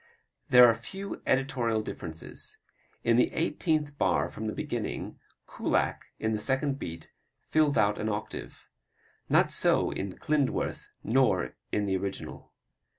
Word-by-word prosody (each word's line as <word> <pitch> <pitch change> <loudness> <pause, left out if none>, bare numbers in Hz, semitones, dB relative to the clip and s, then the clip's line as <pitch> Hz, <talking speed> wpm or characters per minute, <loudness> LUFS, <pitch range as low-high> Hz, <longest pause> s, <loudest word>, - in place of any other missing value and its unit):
There 125 0 +9
are 115 - +5
few 190 - -7
editorial 120 -5 +1
differences. 80 -5 -6 0.5
In 115 0 +4
the 125 - +4
eighteenth 155 -3 0
bar - - +2
from - - -5
the - - -2
beginning, - - -4 0.3
Kullak, - - 0
in 110 - -1
the 110 - 0
second 135 +4 0
beat, 85 0 -7 0.4
fills 150 -4 +3
out 105 -1 +3
an 110 - -1
octave. 105 0 -5 0.6
Not - - +4
so - - +3
in 95 -2 -4
Klindworth 150 -3 0 0.2
nor 115 - +2 0.2
in 105 - +1
the 95 -1 +1
original. 100 +1 -5
115 Hz, 135 wpm, -29 LUFS, 105-140 Hz, 0.6 s, There